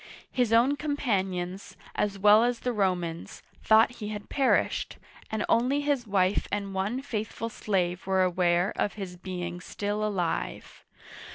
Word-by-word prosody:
His 245 -3 +1
own 245 +5 +4
companions, 195 -10 -2 0.2
as 200 -1 -1
well 210 +3 +6
as 240 -1 0
the 250 - -1
Romans, 180 -5 -2 0.2
thought 220 +2 +5
he 210 - -3
had 210 -1 -7
perished, 275 -2 +1 0.3
and 220 - -1
only 260 +5 +2
his 285 -5 0
wife 195 -1 +1
and 200 -1 -2
one 205 +8 -2
faithful 225 -2 -4
slave 185 -5 -1
were 190 -1 +3
aware 180 0 +2
of 205 - 0
his 190 -4 -7
being 180 -1 -5
still 205 +2 -3
alive. 190 -6 -3
205 Hz, 145 wpm, -28 LUFS, 185-230 Hz, 0.3 s, well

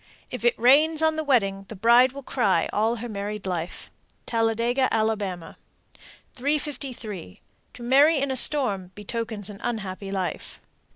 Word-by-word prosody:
If 250 - -6
it 240 - +2
rains 305 +6 +4
on 315 0 +3
the 315 - -2
wedding, 195 -9 +1
the 220 - -8
bride 235 +5 +5
will 280 +1 -9
cry 200 -11 +1
all 220 +3 +1
her 240 +1 -6
married 210 -1 -5
life. 175 -2 -5 0.3
Talladega, 230 +3 +1
Ala. 220 0 +2 1.2
353. 255 - -4 0.4
To 245 - -10
marry 285 +6 +5
in 275 0 -1
a - - -1
storm 220 -10 +2
betokens 215 -1 -5
an 200 - -12
unhappy 200 -4 -4
life. 190 -2 -4
230 Hz, 140 wpm, -25 LUFS, 200-265 Hz, 1.2 s, bride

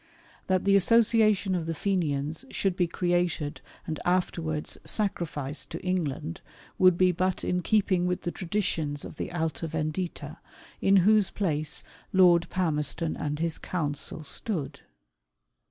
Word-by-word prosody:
That 185 0 +1
the 200 0 +5
association 215 -1 +4
of 170 -3 -2
the 165 - -2
Fenians 155 - -1
should 195 -3 0
be 180 -2 +1
created 175 -3 -1 0.2
and 155 -2 -4
afterwards 170 -4 -1
sacrificed 160 -8 -2
to - - -7
England, 155 - -2 0.4
would 185 -2 +6
be 185 0 +4
but 185 +1 -1
in 180 0 0
keeping 185 -2 +2
with 180 0 -1
the 175 - -2
traditions 165 -7 -2
of - - -10
the - - -4
Alta 160 -1 -2
Vendita, 155 0 -4 0.4
in 195 - +4
whose 210 -2 +5
place 155 -6 -2 0.3
Lord 175 -2 +5
Palmerston 160 -2 0
and 150 0 -3
his 165 0 -1
council 155 -2 -1
stood. 155 0 -3
175 Hz, 135 wpm, -28 LUFS, 155-185 Hz, 0.4 s, would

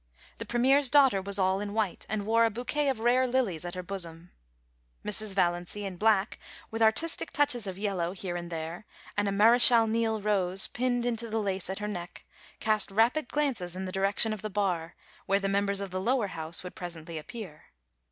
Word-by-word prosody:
The - - -5
Premier's 265 +3 +3
daughter 270 -9 +5
was 200 +1 -2
all 190 0 +2
in 205 0 -5
white, 215 -5 -2
and 205 -1 -2
wore 230 +2 +3
a - - +2
bouquet 250 +6 -1
of 250 -5 -2
rare 250 +2 +3
lilies 235 -10 0
at 175 - -6
her 180 - -5
bosom. 175 -2 -7 0.7
Mrs. 210 -1 -1
Valiancy, 175 +2 -1
in 190 -2 -6
black, 210 0 +2 0.3
with 225 0 -4
artistic 225 +10 +1
touches 255 -7 +2
of 190 -1 -5
yellow 190 -4 -2
here 185 -2 -5
and 175 0 -6
there, 165 +4 -6 0.3
and 205 0 0
a - - 0
Mardchal 230 +3 +6
Niel 225 0 0
rose 195 -2 +1
pinned 245 -1 -1
into 235 -1 -2
the 220 - -2
lace 195 -4 -2
at 190 - -3
her 210 - -4
neck, 175 -4 -7 0.3
cast 215 -1 +1
rapid 235 +8 +2
glances 245 -13 -1
in 190 +1 -4
the 185 - -5
direction 200 +3 +2
of 215 - -7
the 215 - -4
bar, 185 -5 -2 0.3
where 195 +1 +2
the 195 - -2
members 200 0 0
of 195 -2 -5
the 185 0 -3
Lower 235 -1 +1
House 160 +1 -3
would 180 - -8
presently 165 -2 -7
appear. 185 -2 -10
205 Hz, 200 wpm, -28 LUFS, 185-230 Hz, 0.7 s, Mardchal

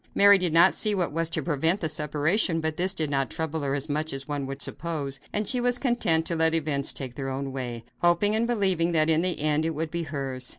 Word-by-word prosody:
Mary 200 0 +6
did 180 -3 +1
not 170 +3 +5
see 210 -1 +3
what 180 -3 -1
was 165 +1 -1
to 165 - -2
prevent 165 +4 0
the 160 - -1
separation, 155 +4 0
but 160 -1 -2
this 185 +3 +3
did 155 - 0
not 135 -1 0
trouble 160 -1 -4
her 140 -1 -1
as 140 +1 -4
much 155 +1 -2
as 135 0 -4
one 145 -2 -4
would 135 +1 -6
suppose, 145 -4 -2
and 210 0 -2
she 250 +1 0
was 245 0 +1
content 240 - +1
to 170 - -1
let 160 0 +2
events 145 -3 0
take 130 -3 -5
their 135 +1 -5
own 135 +1 -4
way, 120 -3 -6 0.2
hoping 175 +4 +2
and 230 +1 0
believing 190 -7 +1
that 155 0 +3
in 160 +1 +2
the 180 0 0
end 150 +1 +1
it 160 -1 -2
would 155 +1 -4
be 170 - -3
hers. 135 -5 -5
160 Hz, 250 wpm, -25 LUFS, 140-175 Hz, 0.2 s, Mary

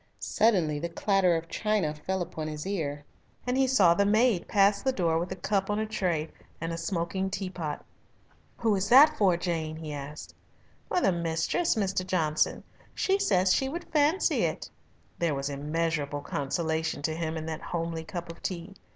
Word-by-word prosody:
Suddenly 175 -10 +2
the 170 +3 -3
clatter 185 0 +2
of 165 0 -3
china 210 -6 0
fell 180 +5 -2
upon 160 -3 -6
his 150 0 -5
ear, 150 -7 -3 0.4
and 250 0 0
he 265 0 +3
saw 200 -10 +5
the 200 - +2
maid 215 -1 +3
pass 200 0 +3
the 265 - +1
door 170 -8 +1
with 175 +2 -4
a - - -2
cup 195 0 -1
on 205 - 0
a 215 - 0
tray 180 -7 -1 0.3
and 165 +1 -3
a - - -4
smoking 190 +2 -2
teapot. 185 -6 -4 0.7
"Who 225 -3 +2
is 195 +1 -1
that 275 +5 +8
for, 190 -4 +3
Jane?" 165 -3 -2
he 155 -1 -6
asked. 145 +1 -7 0.5
"For 360 - +1
the - - +4
mistress, 170 - 0
Mr. 195 -3 0
Johnson. 160 -5 0 0.3
She 390 0 +1
says 185 - +3
she 265 - +1
would 340 +4 -7
fancy 305 +5 +3
it." - - -2 0.5
There 165 -4 +1
was 140 +1 -3
immeasurable 150 0 -2
consolation 160 +2 -2
to 155 - 0
him 160 -1 -3
in 155 - -5
that 160 -1 -4
homely 165 -1 -3
cup 170 0 -6
of 165 - -14
tea. 180 +1 -5
175 Hz, 180 wpm, -28 LUFS, 160-200 Hz, 0.7 s, that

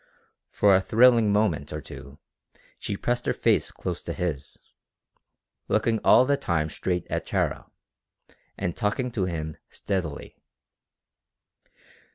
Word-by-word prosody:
For 100 -1 +4
a 95 - +5
thrilling 115 0 +4
moment 100 -9 0
or 75 - -4
two 70 -1 -11 0.6
she 100 - -4
pressed 120 +3 -2
her - - +1
face - - +2
close - - -5
to - - -5
his, 75 -6 -4 1.1
looking 110 +1 +1
all 125 - +6
the 140 +1 +2
time 80 - -1
straight 90 -2 -2
at - - -3
Tara, - - -1 0.9
and 85 - -3
talking 125 +5 -1
to 100 -5 -1
him 80 -3 -4
steadily. 90 -7 -4
95 Hz, 125 wpm, -26 LUFS, 80-115 Hz, 1.1 s, all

